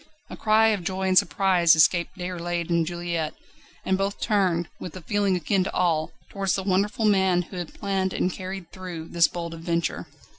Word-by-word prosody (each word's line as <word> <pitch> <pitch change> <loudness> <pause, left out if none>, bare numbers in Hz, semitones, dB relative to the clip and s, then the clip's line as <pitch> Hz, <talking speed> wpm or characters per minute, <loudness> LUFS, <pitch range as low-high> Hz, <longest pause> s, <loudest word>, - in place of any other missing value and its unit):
A - - -5
cry 220 +1 +4
of 205 -5 -1
joy 190 +1 -1
and 185 - +2
surprise 185 -4 +4
escaped 170 +3 +3
Déroulède 175 -1 -3
and 170 -1 +2
Juliette, 170 -2 -3 0.5
and 190 0 +1
both 195 +1 -2
turned, 185 -5 +1
with 180 - -7
a - - -9
feeling 200 +2 +1
akin 185 +3 +1
to - - -4
awe, 160 -3 +1 0.2
towards 195 -2 0
the 190 - -2
wonderful 200 +3 0
man 190 -3 +3
who 180 +2 -10
had 175 -3 -6
planned 195 -2 -1
and 180 - -1
carried 185 -2 -7
through 180 -4 -7
this 170 -1 +4
bold 170 -1 -6
adventure. 170 0 -2
185 Hz, 185 wpm, -25 LUFS, 170-195 Hz, 0.5 s, cry